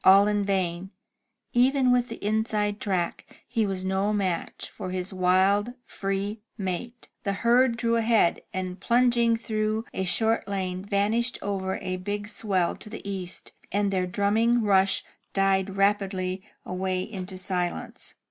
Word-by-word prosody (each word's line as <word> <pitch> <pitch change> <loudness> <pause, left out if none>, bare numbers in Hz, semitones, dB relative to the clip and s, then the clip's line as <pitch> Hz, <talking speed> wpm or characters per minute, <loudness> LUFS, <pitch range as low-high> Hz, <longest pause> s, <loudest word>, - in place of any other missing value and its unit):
All 195 +2 +7
in 205 -1 +1
vain, 185 -2 -1 0.6
even 255 +1 +4
with 250 0 +2
the - - -7
inside 210 -1 0
track 185 -4 -3
he 225 -3 0
was 190 -1 -3
no 190 +2 +1
match 190 -5 -2
for - - -7
his 185 +1 -3
wild, 190 +5 +3
free 200 +2 -3 0.2
mate. 215 +5 -4
The 200 - -1
herd 240 0 +4
drew 230 -1 +1
ahead, 225 -6 +3
and 185 0 -4
plunging 235 -1 +3
through 215 0 -1
a 190 - -1
short 220 +5 +2
lane, 185 -2 -3
vanished 215 +5 +1
over 190 -1 -2
a 185 -1 -3
big 205 +2 -4
swell 195 -5 0
to - - -9
the 215 -2 -8
east, 185 -2 -5 0.2
and 200 0 +1
their 185 -1 0
drumming 220 +5 +2
rush 195 -2 +3 0.3
died 195 0 +2
rapidly 195 -2 +1 0.2
away 185 0 -1
into 190 -3 -6
silence. 180 -1 -3
200 Hz, 145 wpm, -26 LUFS, 185-220 Hz, 0.6 s, All